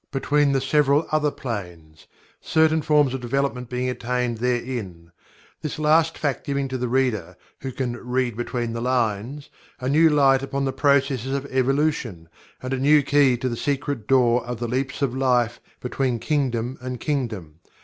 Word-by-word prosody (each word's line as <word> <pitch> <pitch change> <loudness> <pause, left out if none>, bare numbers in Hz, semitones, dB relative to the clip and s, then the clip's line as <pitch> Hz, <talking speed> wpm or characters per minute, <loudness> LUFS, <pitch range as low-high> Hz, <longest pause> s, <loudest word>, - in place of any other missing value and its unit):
between 145 +1 +1
the 135 - +2
several 145 +2 +2
other 155 -1 +2
planes, 90 - -7 0.3
certain 160 0 +2
forms 145 -3 +3
of 130 - -4
development 125 0 -2
being 125 0 -2
attained 125 -2 -2
therein 115 -9 -3 0.5
this 155 - -4
last 160 +2 +3
fact 145 -3 -2
giving 140 -1 -2
to 130 - -5
the 125 -1 -2
reader 115 -9 -1 0.2
who 135 - -5
can 125 -1 -3
"read 125 -1 -1
between 120 0 -3
the 115 - -4
lines" 125 +2 -1 0.3
a 130 - -4
new 160 +4 +5
light 135 -3 +4
upon 135 0 -2
the 135 - -1
processes 140 -2 +1
of 140 0 -3
Evolution, 130 - 0 0.4
and 130 +1 -3
a 130 - -1
new 145 +2 +5
key 140 -2 +3
to 130 - -2
the 120 - -2
secret 140 -3 -2
door 125 -2 +3
of 120 0 -5
the 120 - -2
"leaps 135 +4 -2
of 130 -2 0
life" 125 -3 +1 0.2
between 125 -1 -1
kingdom 125 -2 -1
and 125 -1 -5
kingdom. 110 - -3
130 Hz, 170 wpm, -23 LUFS, 120-140 Hz, 0.5 s, new